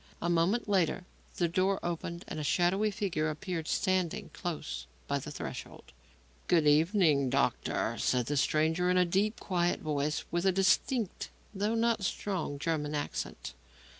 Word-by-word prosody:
A 170 - 0
moment 175 +8 +2
later 185 -3 +1 0.3
the 175 - +1
door 190 +3 +1
opened 170 0 -4
and - - -5
a - - -3
shadowy 180 +7 +2
figure 180 -7 -1
appeared 160 +1 -4
standing 185 +1 0
close 70 - -5 0.2
by - - 0
the - - -7
threshold. - - -7 0.5
"Good 165 -3 +4
evening, 150 - +4
doctor," - - 0
said 125 -2 +1
the 145 - -1
stranger, 160 +5 +2
in 180 - +3
a 180 - +5
deep, 200 +5 0
quiet 175 -2 0
voice 150 -1 -1
and - - -18
with 175 +2 +1
a - - +6
distinct, 195 +4 +1 0.2
though 205 +3 0
not 230 -2 +1
strong, 185 -5 -2
German 150 -1 -1
accent. 145 - -4
175 Hz, 155 wpm, -31 LUFS, 155-195 Hz, 0.5 s, a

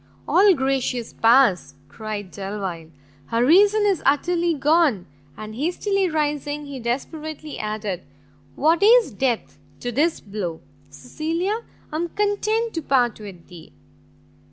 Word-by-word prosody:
"All 390 -1 +5
gracious 265 -3 -1
powers!" 225 - +3
cried 205 +4 -6
Delvile, 195 -5 -5 0.4
"her 230 +1 +1
reason 405 +8 +5
is 390 -5 +1
utterly 335 +4 +1
gone!" 290 - +2 0.3
And, 215 0 -8
hastily 360 - 0
rising, 295 -1 -2
he 280 -2 -7
desperately 300 +5 -5
added, 210 -4 -3 0.5
"what 320 +4 +2
is 450 - +5
death 240 +1 -2 0.2
to 245 - -4
this 305 +7 +1
blow? 195 -5 -5 0.3
Cecilia, 340 +7 -3 0.3
I 305 - -3
am 340 +1 -2
content 430 +3 0
to 325 - -3
part 245 -6 +1
with 195 -5 -11
thee!" 170 - -14
275 Hz, 125 wpm, -22 LUFS, 215-340 Hz, 0.5 s, All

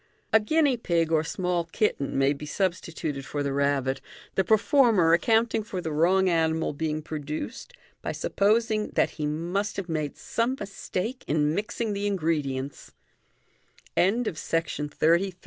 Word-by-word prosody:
A 220 - +8
guinea 285 +3 +2
pig 170 -7 0
or 155 -1 +3
small 180 0 -1
kitten 160 -6 -1
may 135 +1 +3
be 150 +1 -8
substituted 165 -5 -2
for 145 +1 -3
the 140 -1 -1
rabbit, 140 -1 +1 0.3
the 190 - +2
performer 220 - +4
accounting 225 +5 +3
for 205 -3 -5
the 160 -3 -3
wrong 180 +5 +3
animal 160 -2 +1
being 155 +1 -2
produced 155 - -5 0.3
bj - - -3
supposing 215 +1 +1
that - - +1
be 150 -2 -1
must 175 +7 -2
have 195 -3 -3
made 155 -3 -2
some 240 +3 -1
mistake 200 +4 -4
in 150 0 +2
mixing 215 +3 -2
the 200 +1 -1
ingredients, 150 -8 -2 1.0
MODERN 210 +1 +2
170 Hz, 135 wpm, -27 LUFS, 150-210 Hz, 1.0 s, A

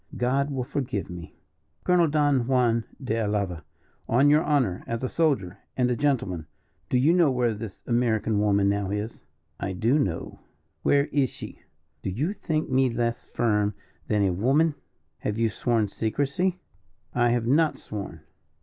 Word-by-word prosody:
"God 135 +3 +1
will 135 -3 -2
forgive 125 -8 -3
me." 85 -1 -9 0.5
"Colonel 180 -2 +4
Don 145 -5 +2
Juan 120 -3 +2
de 115 -4 -2
Alava, 100 -6 -1 0.5
on 135 +5 +5
your 150 +1 +5
honour, 130 -12 +1
as 115 +1 -3
a - - +1
soldier 130 - 0 0.2
and 125 -1 +2
a - - +1
gentleman, 115 - 0 0.4
do 125 - +2
you 145 +7 +4
know 175 -4 +5
where 125 -3 +1
this 105 -2 -8
American 115 -3 +1
woman 100 -1 +3
now 100 -1 0
is?" 105 +3 -4 0.4
"I 95 - -3
do 115 +10 +2
know." 85 - -2 0.4
"Where 140 0 +3
is 140 -4 +2
she?" - - -9 0.4
"Do - - -3
you 145 - -1
think 160 -6 -2
me 130 0 +3
less 115 0 -2
firm 105 -3 +1 0.3
than 105 -2 +2
a 95 -2 +2
woman?" 140 - +3 0.5
"Have 105 +1 -2
you 115 0 +2
sworn 115 0 0
secrecy?" 140 - -1 0.5
"I 120 -1 +3
have 120 -1 +1
not 150 +6 +3
sworn." 105 -2 -7
120 Hz, 160 wpm, -26 LUFS, 105-140 Hz, 0.5 s, on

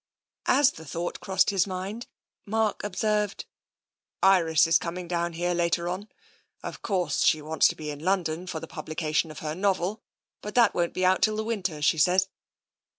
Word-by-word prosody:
As 285 -1 +5
the 160 - -12
thought 170 +3 -4
crossed 190 +1 +2
his 195 -1 +2
mind, 195 +5 -5 0.4
Mark 220 0 0
observed: 210 +1 -1 0.4
" - - -26 0.2
Iris 160 -1 +3
is 165 +1 +4
coming 175 +1 -5
down 170 0 -1
here 175 +2 -1
later 170 0 0
on. 190 +4 -4 0.5
Of - - -7
course, 180 -8 0
she 155 - +4
wants 155 +1 +3
to - - -2
be 150 -1 -5
in 145 - -8
London 175 0 -1
for 160 - -4
the 165 - -7
publication 155 0 -2
of 155 - -10
her 150 - -2
novel, 190 +2 0 0.4
but 210 0 -7
that 240 -2 +5
won't 175 -1 -1
be 185 - +1
out 185 +1 +3
till 215 -1 +3
the 215 - -2
winter, 195 -9 -3
she 155 - +3
says. 185 +4 +3
180 Hz, 185 wpm, -27 LUFS, 165-200 Hz, 0.5 s, As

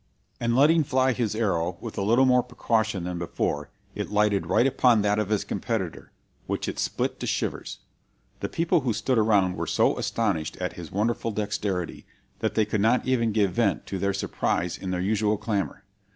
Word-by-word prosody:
"And 115 0 0
letting 155 +4 +5
fly 130 -1 +2
his 115 -4 -1
arrow 90 -6 0
with 115 - -7
a - - -2
little 115 +6 +4
more 125 -1 +5
precaution 110 -5 -1
than 90 0 -4
before, 75 -3 -2 0.2
it 105 - -4
lighted 105 -1 +2
right 120 - +3
upon 125 -5 +4
that 105 0 +2
of 105 -2 -1
his 105 -2 +1
competitor, 100 -9 -3 0.4
which - - -2
it - - -4
split - - -1
to - - -4
shivers. - - -2 0.6
The - - -3
people 170 +1 +2
who 125 -5 -1
stood 115 +3 +1
around 100 -4 +3
were - - -3
so - - +2
astonished 100 -9 -1
at 90 0 -3
his 85 -3 -9
wonderful 115 +3 0
dexterity, 105 -4 -3 0.3
that - - -1
they 110 - +3
could 105 -1 -1
not 115 +4 +3
even 120 -3 +1
give 105 -3 +2
vent 100 +1 0
to 95 - -4
their 100 +2 +1
surprise 90 -2 -1
in 95 - -6
their 90 -1 -1
usual 105 +2 +1
clamor. 100 -2 -2
105 Hz, 190 wpm, -26 LUFS, 95-115 Hz, 0.6 s, letting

